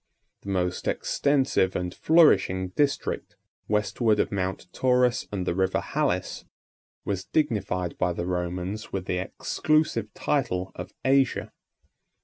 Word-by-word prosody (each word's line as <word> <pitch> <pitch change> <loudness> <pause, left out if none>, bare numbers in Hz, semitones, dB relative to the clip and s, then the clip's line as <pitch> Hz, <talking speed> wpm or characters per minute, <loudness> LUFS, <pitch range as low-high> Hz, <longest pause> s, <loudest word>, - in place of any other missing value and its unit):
The 100 - -8
most 90 -2 -1
extensive 135 -10 +1
and 90 -1 -2
flourishing 120 - +4
district, 140 +9 -1 0.3
westward 105 +1 +1
of - - +1
Mount 95 -1 -2
Taurus 125 -1 +2
and 95 -3 -2
the 85 - 0
River 95 +1 +1
Halys, - - -1 0.6
was 95 -1 -2
dignified 100 - -1
by 90 - +2
the 85 - -3
Romans 90 +3 -3
with 95 -2 -3
the 90 - -1
exclusive 115 +2 0
title 95 -10 -1
of - - -8
Asia. 135 -1 +2
100 Hz, 125 wpm, -26 LUFS, 90-125 Hz, 0.6 s, flourishing